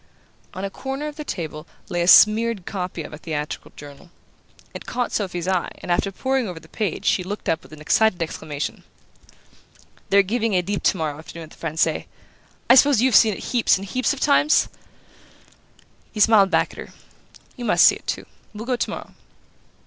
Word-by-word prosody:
On 190 +1 -4
a 195 - -5
corner 270 +6 -5
of 300 - -7
their 300 - -6
table 160 - -6 0.2
lay 175 - -2
a 170 - 0
smeared 215 0 +6
copy 180 -4 -4
of - - -10
a 150 - -9
theatrical 155 -3 -5
journal. 145 +3 -13 0.6
It - - -9
caught 245 0 -2
Sophy's 180 -4 -3
eye 185 -2 0
and - - -6
after 195 +3 +1
poring 260 +3 -1
over 175 -3 -7
the - - -18
page 215 -3 -3
she 185 - +2
looked 205 +3 -6
up 165 - 0
with - - -18
an 155 - -11
excited 205 +4 +2
exclamation. 155 -3 -5 1.3
"They're 200 0 +5
giving 225 +1 -1
Oedipe 185 +3 -1
tomorrow 155 -5 0
afternoon 165 +1 -10
at 155 - -12
the - - -16
Francais! 160 -1 -1 0.6
I - - +7
suppose 275 -1 +6
you've 260 -2 +3
seen 215 -3 +6
it - - -9
heaps 240 -5 +3
and 195 - -7
heaps 255 +6 0
of 285 - -4
times?" 295 +1 +3 1.4
He 215 - -7
smiled 205 -2 +5
back - - +1
at - - -13
her. - - -9 0.6
"You 245 - -6
must 215 - +5
see - - +7
it - - -25
too. - - -3 0.3
We'll 215 +2 -6
go 250 0 0
tomorrow." - - -5
195 Hz, 185 wpm, -22 LUFS, 170-230 Hz, 1.4 s, I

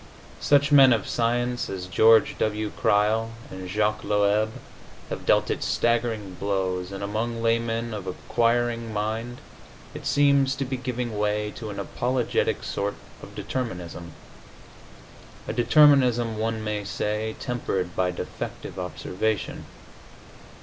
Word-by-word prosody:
Such 140 0 +3
men 135 -3 +8
of 110 -4 -1
science 120 +1 0
as 95 -2 -4
George 110 +5 +5
W. 105 0 -1
Crile 110 +2 +2 0.2
and 95 -1 -7
Jacques 105 +1 0
Loeb 105 +1 +2 0.6
have - - -5
dealt - - +3
it - - -2
staggering 115 -4 0
blows, 95 -2 -1
and 100 0 -6
among 115 +3 -2
laymen 115 0 0
of 100 -3 -6
inquiring 115 +4 0
mind 110 +3 -3 0.5
it - - -6
seems 140 -1 +3
to 135 0 -2
be 130 +1 -3
giving 125 -3 -3
way 105 0 0
to 110 -1 -7
an 100 - -6
apologetic 125 +5 -1
sort 100 +1 -2 0.3
of - - -12
determinism 90 -9 -5 1.3
a - - -2
determinism, 120 -3 +4
one 110 0 -1
may 105 -1 -2
say, 105 +2 -2
tempered 95 -8 -2
by 90 -1 +1
defective 90 +1 -6
observation. 90 +2 -3
110 Hz, 125 wpm, -25 LUFS, 100-120 Hz, 1.3 s, men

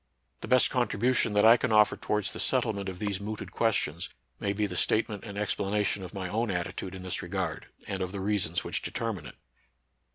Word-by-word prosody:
The - - -7
best 130 -2 +5
contribution 125 -2 +2
that 105 +1 +4
I 115 +2 +9
can 125 - -1
offer 105 -1 +5
towards 105 -2 -1
the - - -7
settlement 100 -3 0
of 95 - -7
these 100 0 -2
mooted 105 +1 -5
questions 95 -7 +1 0.3
may 100 - 0
be 105 +1 0
the 90 -3 -4
statement 105 +2 +1
and 100 -2 -7
explanation 105 -1 0
of 90 - -7
my 95 -3 -4
own 110 +5 -1
attitude 90 0 -3
in 95 - -8
this 95 - -2
regard, 90 -3 -3 0.2
and 95 -2 -3
of 90 -1 -2
the 100 - -5
reasons 95 -4 0
which - - -2
determine - - -3
it. - - -11
100 Hz, 200 wpm, -29 LUFS, 95-110 Hz, 0.3 s, I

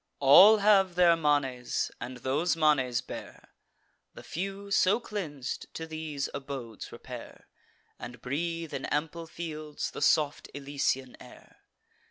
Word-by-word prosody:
All 185 +11 +8
have 200 -3 +4
their 175 -2 +5
manes, 145 -6 0
and 125 +1 -6
those 140 +8 0
manes 135 -6 +2
bear: - - -10 0.7
The - - -11
few, 195 +3 -5
so 195 +2 +3
cleans'd, 160 - -6
to 160 - -4
these 155 -3 -4
abodes 135 -6 -7
repair, - - -10 0.5
And 120 0 -8
breathe, 165 +6 -3
in - - -4
ample 160 +2 -3
fields, 155 -3 -6
the - - -8
soft 150 -1 +2
Elysian 135 -2 -2
air. - - -16
150 Hz, 125 wpm, -29 LUFS, 135-170 Hz, 0.7 s, All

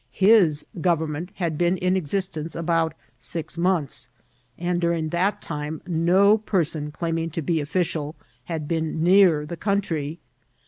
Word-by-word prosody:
His 190 -7 +4 0.2
government 160 -1 0
had 165 -5 -2
been 175 +1 +2
in 180 +1 +1
existence 170 -2 -2
about 165 -1 0 0.2
six 165 -2 -5
months, 170 -4 0 0.5
and 175 0 -1
during 170 -2 0
that 190 +5 0
time 150 0 -4
no 185 +5 +4
person 165 -8 -1
claiming 165 +1 -2
to 165 +1 -4
be 160 +1 0
official 155 -1 -2 0.3
had 160 -3 -4
been 160 -1 -1
near 175 -4 +5
the 170 +3 -6
country. 165 -7 -1
165 Hz, 135 wpm, -24 LUFS, 155-180 Hz, 0.5 s, near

